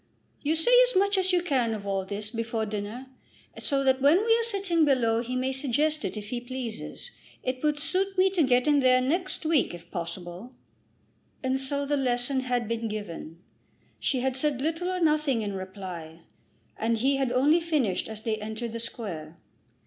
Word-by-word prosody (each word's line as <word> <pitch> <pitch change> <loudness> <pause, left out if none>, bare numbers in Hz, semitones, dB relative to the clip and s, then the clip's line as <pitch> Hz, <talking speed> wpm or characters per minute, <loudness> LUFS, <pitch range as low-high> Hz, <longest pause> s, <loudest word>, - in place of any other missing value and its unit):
"You 305 +2 +1
say 325 +9 +2 0.2
as - - -5
much 400 +2 +3
as 375 0 +2
you 355 -1 +2
can 255 -9 +1
of 205 -1 -7
all 195 -1 -1
this 210 +2 -5
before 230 -1 -2
dinner, 210 +4 -5 0.5
so 275 -2 0
that 265 0 +3
when 290 +5 +6
we 455 0 +5
are - - +1
sitting 390 -7 +1
below 235 -6 +3
he 250 +1 -4
may 255 +1 0
suggest 290 +4 0
it - - -3
if 205 -1 -6
he 240 0 -3
pleases. 250 - -6 0.3
It 255 0 -2
would 300 -1 +1
suit 380 +6 +1
me 375 +1 +4
to 365 -3 +1
get 250 -1 +3
in 295 -1 +5
there 255 -1 +5
next 340 +7 -1
week 310 - +2
if 170 - -14
possible." 175 +7 -6 0.9
And 260 0 +1
so 280 +1 -1
the 290 +1 0
lesson 255 0 +1
had 250 -3 -1
been 230 0 -2
given. 175 -6 -7 0.6
She 260 -3 0
had 260 0 0
said 275 -1 0
little 325 +5 -1
or 365 -1 -2
nothing 300 -7 +2
in 205 -1 -3
reply, 185 -4 -7 0.6
and 230 +1 +1
he 270 +4 +2
had 265 -3 0
only 290 +7 +4
finished 295 - 0
as 220 0 -7
they 220 -1 -1
entered 220 +2 -5
the 230 - -4
Square. 170 -9 -5
255 Hz, 190 wpm, -27 LUFS, 220-300 Hz, 0.9 s, when